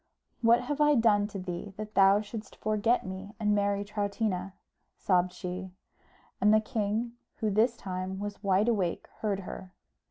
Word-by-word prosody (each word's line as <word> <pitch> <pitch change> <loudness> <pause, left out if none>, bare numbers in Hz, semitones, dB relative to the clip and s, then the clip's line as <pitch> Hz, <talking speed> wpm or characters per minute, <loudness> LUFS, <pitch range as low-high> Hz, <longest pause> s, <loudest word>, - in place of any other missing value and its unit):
"What 235 +1 +5
have 290 +4 -2
I 295 0 +5
done 210 -4 +4
to 205 - -7
thee, 185 +1 -6
that 215 0 -6
thou 195 +1 +6
shouldst 215 +1 -8
forget 215 +2 +1
me 190 +3 -7
and 210 -1 +2
marry 200 0 +1
Troutina?" 200 -2 -2 0.4
sobbed 180 -1 +2
she; 180 0 -6 0.7
and 210 - +5
the 215 - +6
king, 220 +1 -1 0.2
who 215 -1 -1
this 230 +4 +2
time 185 0 -4
was 205 0 -5
wide 200 +1 +2
awake, 195 -7 0
heard 200 -3 -1
her. 185 0 -8
205 Hz, 160 wpm, -29 LUFS, 190-220 Hz, 0.7 s, thou